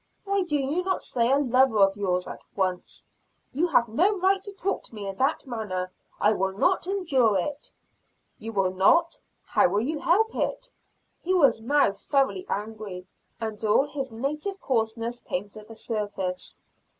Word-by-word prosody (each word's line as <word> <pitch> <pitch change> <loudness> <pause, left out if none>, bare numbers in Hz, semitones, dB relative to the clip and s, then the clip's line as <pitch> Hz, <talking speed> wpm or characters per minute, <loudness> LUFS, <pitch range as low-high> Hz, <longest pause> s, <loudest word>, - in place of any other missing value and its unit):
"Why 395 -1 +1
do 325 -5 0
you 285 +5 0
not 375 0 -1
say 235 0 +1
a 275 - +5
lover 260 -3 +3
of 195 -1 +5
yours, 180 -3 -1
at - - -8
once?" 185 -2 -2 0.5
"You 320 +7 +1
have 245 -7 +3
no 365 - +2
right 385 +1 +2
to 405 - -8
talk 395 0 -2
to - - -14
me 205 -2 -6
in 195 - -4
that 275 +4 +1
manner. 200 -7 -4 0.3
I 210 - +4
will 190 -1 -1
not 365 - +2
endure 280 - +2
it." 285 +10 -4 0.7
"You 225 +1 -6
will 195 -3 +1
not 330 - +3 0.3
how 265 - +3
will 205 - +1
you 300 +6 -2
help 445 +9 +2
it?" - - -2 0.5
He 370 +2 0
was 280 -9 +4
now 285 -1 +3
thoroughly 275 - 0
angry, 205 -3 -5 0.3
and 220 -2 -5
all 215 +6 +4
his 280 -2 -4
native 300 - -3
coarseness 230 -1 -1
came 195 +3 -4
to 215 +1 -11
the 225 - -12
surface. 205 -5 -4
240 Hz, 175 wpm, -26 LUFS, 205-315 Hz, 0.7 s, a